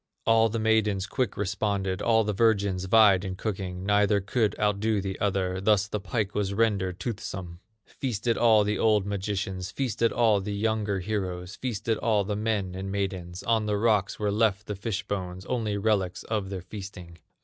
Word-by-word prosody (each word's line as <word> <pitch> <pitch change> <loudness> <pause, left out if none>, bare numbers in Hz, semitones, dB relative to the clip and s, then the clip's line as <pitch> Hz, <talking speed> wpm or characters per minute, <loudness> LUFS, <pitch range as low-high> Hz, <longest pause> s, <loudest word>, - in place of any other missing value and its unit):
All 115 0 +4
the 115 - -2
maidens 110 -3 +2
quick 120 +1 -2
responded, 100 -1 -1
All 115 -1 +3
the 105 0 -1
virgins 100 -4 +2
vied 100 -2 +5
in 95 -1 -4
cooking; 95 -3 -4
Neither 105 0 +3
could 105 +2 0
outdo 105 +1 +1
the 95 -1 -4
other, 95 -2 0
Thus 100 0 +3
the 105 - -3
pike 100 +1 -2
was 100 -1 -1
rendered 100 -5 +1
toothsome. 95 -5 -5 0.3
Feasted 120 -2 -2
all 110 -3 +5
the 105 +1 -1
old 105 -3 +3
magicians, 95 -2 -3
Feasted 115 0 0
all 110 -4 +3
the 100 +1 -4
younger 105 -2 0
heroes, 95 -2 -3
Feasted 115 -3 -2
all 110 -3 +2
the 105 +1 -3
men 105 -3 -1
and 95 +1 -5
maidens; 95 -3 -3
On 110 -2 +1
the 105 -1 +1
rocks 105 -3 +1
were 105 -1 0
left 105 -1 +1
the 105 - -4
fish 105 +1 -4
bones, 95 -2 -4
Only 110 -5 -1
relics 100 -3 0
of 105 -4 -2
their 95 -2 -5
feasting. 90 -4 -9
100 Hz, 175 wpm, -27 LUFS, 95-110 Hz, 0.3 s, vied